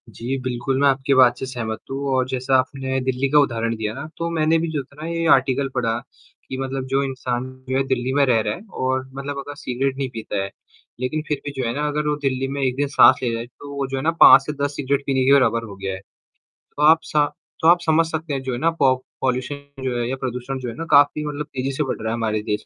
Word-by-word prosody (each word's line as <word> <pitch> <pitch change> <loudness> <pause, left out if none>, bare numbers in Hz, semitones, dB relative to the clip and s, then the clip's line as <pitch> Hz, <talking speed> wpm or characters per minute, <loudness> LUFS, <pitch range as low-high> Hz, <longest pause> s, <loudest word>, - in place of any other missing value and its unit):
जी, 120 +5 -4
बिल्कुल, 130 +1 -2
मैं 140 - +5
आपकी 135 +1 +2
बात 125 -2 +5
से - - -3
सहमत 115 -4 -4
हूँ 135 - -3
और 130 -1 +1
जैसा 130 +1 0
आपने 130 0 -2
दिल्ली 130 +1 0
का 150 +2 +5
उदाहरण 115 -4 0
दिया 110 -1 -3
ना, 135 +5 -7
तो 170 0 -2
मैंने 160 -1 +2
भी 165 - -1
जो 150 -3 -1
था 140 - -23
ना 160 - -4
ये 165 0 -2
आर्टिकल 135 +1 +3
पढ़ा, 115 -3 0 0.5
कि 130 - -4
मतलब 135 0 -3
जो 140 +1 +3
इंसान 130 -2 -3 0.3
जो 130 - +1
है 135 - +2
दिल्ली 130 0 -1
में 145 0 +4
रह 120 -4 +3
रहा 105 -1 -1
है - - -12 0.2
और 130 0 0
मतलब 140 +1 -5
अगर 145 +1 -7
सिगरेट 135 0 -2
नहीं 135 -2 -2
पीता 110 -3 -3
है। 100 - -5 0.5
लेकिन 130 +5 -2
फिर 150 -2 -2
भी 145 - -3
जो - - -1
है 115 - -1
ना 150 +1 -1
अगर 150 0 -1
वो 150 - +1
दिल्ली 135 -1 0
में 140 +1 -4
1 130 -2 +1
दिन 145 +1 0
सांस 130 -2 +6
ले 125 - +1
रहा 115 - -2
है, 120 - -8
तो 140 +4 -11
वो 140 -1 -2
जो 135 0 -3
है 135 - -3
ना 165 - +3
5 135 - +10
से 150 - -3
10 145 0 -1
सिगरेट 140 0 -1
पीने 135 -1 +1
के 135 - +6
बराबर 115 -4 +3
हो 100 -3 -9
गया 95 0 -4
है। 95 - -6 0.6
तो 150 - -6
आप 160 +2 +7
सा 150 -1 +2 0.4
तो 160 - +3
आप 175 +1 +7
समझ 160 +1 +4
सकते 160 -1 -4
हैं 135 - -2
जो 130 -1 -3
है - - -2
ना 165 - +3
पो 130 -2 +5 0.3
पॉल्यूशन 135 +2 -3
जो 125 -2 -1
है 120 - -1
या 130 - -1
प्रदूषण 125 +1 -3
जो 125 -2 -4
है 115 - -7
ना 165 - -5
काफ़ी 145 +1 +5
मतलब 150 0 -4
तेजी 130 +1 -1
से 140 +3 -1
बढ़ 135 - -3
रहा 110 - -3
है 110 - 0
हमारे 110 -2 -1
देश 105 0 -3
135 Hz, 275 wpm, -22 LUFS, 125-145 Hz, 0.6 s, 5